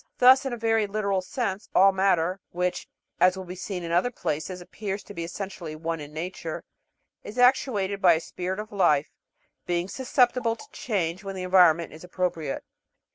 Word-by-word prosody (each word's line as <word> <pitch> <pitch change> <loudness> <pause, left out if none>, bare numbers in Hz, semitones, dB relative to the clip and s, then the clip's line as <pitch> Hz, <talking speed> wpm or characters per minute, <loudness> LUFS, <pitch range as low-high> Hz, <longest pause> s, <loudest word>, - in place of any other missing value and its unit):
Thus, 260 +2 +6
in - - -3
a 240 - -3
very 225 -2 +1
literal 200 -2 0
sense, 200 +1 -3
all 195 +1 +7
matter 190 -1 +1
which, 180 +1 -2 0.3
as 185 +1 +4
will 190 - -6
be 180 - -7
seen 185 0 -5
in 170 - -4
other 175 +8 +3
places, 180 -4 -3
appears 200 +2 -5
to - - -11
be 170 - -4
essentially 175 -2 -6
one 165 +1 -3
in 145 0 -8
nature 165 0 -5 0.6
is 215 - -9
actuated 225 -6 +2
by 175 -2 +7
a 160 - +1
spirit 180 +2 -4
of 215 +1 -6
life, 160 -7 +2 0.6
being 175 0 0
susceptible 245 -1 +1
to - - -12
change 185 -5 -2
when 195 -1 -5
the 185 - -4
environment 175 -3 +4
is 155 - -12
appropriate. 180 -5 -2
185 Hz, 180 wpm, -26 LUFS, 170-210 Hz, 0.6 s, all